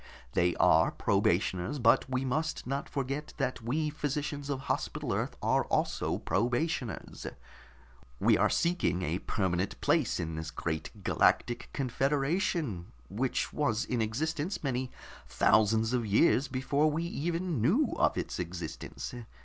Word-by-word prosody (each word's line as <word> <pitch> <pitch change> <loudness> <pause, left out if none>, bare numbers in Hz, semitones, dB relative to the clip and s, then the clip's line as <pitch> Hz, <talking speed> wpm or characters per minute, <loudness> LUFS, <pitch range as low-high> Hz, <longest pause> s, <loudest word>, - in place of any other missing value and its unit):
They 90 0 +2
are - - +5
probationers, 95 +10 +1
but 115 0 +4
we 130 0 -1
must 155 +5 -1
not 135 +2 -3
forget 140 +2 -3
that 130 -3 -1
we 150 +7 -1
physicians 145 -1 -3
of 135 -2 -2
Hospital 140 - -2
Earth - - -2
are - - +2
also - - 0
probationers. 120 - -2 0.9
We - - +5
are - - +3
seeking 170 - +1
a 85 +3 -1
permanent 95 -1 -1
place - - +2
in 80 0 -3
this 80 0 -4
great 80 +5 -4
Galactic 120 +4 +2
Confederation, 135 - 0 0.2
which 125 +6 -1
was 120 -6 0
in 125 -3 -1
existence 155 - -2
many 130 -2 -1 0.4
thousands 110 +3 +3
of 125 -2 +1
years 115 +6 +4
before 140 +4 +1
we 155 +2 -1
even 170 -3 -2
knew 230 - +3
of - - +3
its - - -3
existence. 85 -2 -5
130 Hz, 135 wpm, -30 LUFS, 110-150 Hz, 0.9 s, are